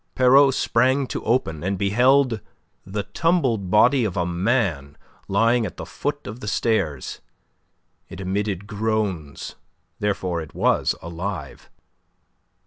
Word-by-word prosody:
Pierrot 135 +1 +5
sprang 130 +3 +2
to - - -5
open, 95 - 0
and 95 +1 -1
beheld 120 +4 +3 0.5
the 100 +1 -3
tumbled 130 - 0
body 120 +6 +4
of 100 -4 -2
a 90 - +1
man 85 - -1 0.3
lying 115 +4 +3
at 90 -8 -5
the - - -6
foot - - -4
of 110 +4 -7
the 105 - -8
stairs. 95 - -1 0.9
It - - -9
emitted 95 0 -2
groans, 105 - -3 0.4
therefore 95 -4 -1
it 80 - -11
was - - +2
alive. 85 -3 -6
105 Hz, 125 wpm, -23 LUFS, 90-120 Hz, 0.9 s, Pierrot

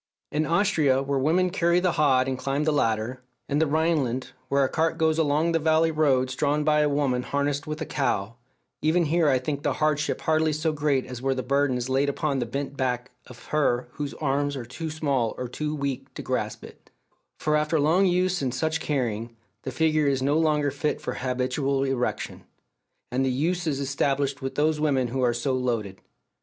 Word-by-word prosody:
In 155 +1 0
Austria, 160 -7 +2
where 140 0 0
women 175 +6 +2
carry 170 -1 +2
the 180 -1 +1
hod 135 -5 +3
and 130 - -1
climb 135 +3 -1
the 155 - +2
ladder; 115 -1 0 0.3
in 145 - 0
the 160 - +3
Rhineland, 145 -5 0 0.2
where 140 0 +3
a - - +3
cart 160 +4 0
goes 160 0 +2
along 155 +2 +2
the 165 - +2
valley 160 +1 +3
roads 130 -5 +2
drawn 150 +2 +1
by 150 0 +3
a 150 0 +3
woman 140 -3 +1
harnessed 140 +2 -2
with 155 +1 -4
a - - -1
cow 115 -8 -1 0.5
even 165 +2 +2
here 160 0 +2
I 130 - +4
think 140 +3 -3
the 145 -2 0
hardship 150 +1 0
hardly 155 0 +2
so 155 +1 0
great 145 -3 +1
as 125 -1 -8
where 135 0 0
the 130 - -3
burden 140 0 +1
is 125 0 -3
laid 135 +2 +1
upon 140 -1 -1
the 120 - -2
bent 140 +3 -4
back 125 -2 -2 0.2
of 125 -2 -13
her 125 -5 +1
whose 145 +1 -5
arms 145 0 -1
are 125 -3 -5
too 145 +7 -6
small 140 -7 -1
or 125 - -3
too 150 +5 -3
weak 135 -2 -4
to - - -6
grasp 130 -1 -3
it; - - -14 0.5
for 150 0 0
after 150 +1 +1
long 170 +7 +3
use 180 0 +1
in 130 -2 0
such 160 +6 -1
carrying, 115 -6 -2 0.2
the 130 - -5
figure 155 +2 +2
is 135 -2 +1
no 140 +2 +2
longer 150 -3 +2
fit 145 +2 -2
for - - -4
habitual 130 +2 -1
erection. 135 -2 -2 0.7
And 130 +2 +1
the 130 - +1
use 165 +7 -1
is 140 -3 0
established 140 0 -1
with 135 0 -4
those 150 +1 +1
women 135 -5 +1
who 130 +2 -2
are 125 -1 +3
so 125 +3 -1
loaded. 115 -7 -2
140 Hz, 205 wpm, -25 LUFS, 130-155 Hz, 0.7 s, I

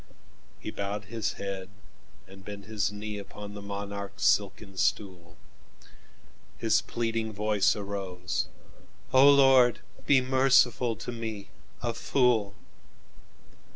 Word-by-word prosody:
He - - -6
bowed 100 +1 -4
his 110 +1 -3
head, 95 -1 -5 0.6
and 95 0 -14
bent 100 0 -8
his 105 -1 -1
kneeUpon 105 0 -7
the 105 - -8
monarch's 100 0 -5
silken 100 -1 +1
stool; 90 -4 -2 1.2
His - - +2
pleading 115 -1 -2
voice 105 -1 +2
arose: 95 -4 -3 0.7
"O 135 +2 +8
Lord, 135 -3 +6 0.3
Be 140 -2 +6
merciful 130 -2 +3
to 115 +3 -6
me, 110 -4 -6 0.3
a 120 -1 -1
fool! 115 -4 +1
105 Hz, 105 wpm, -28 LUFS, 100-115 Hz, 1.2 s, O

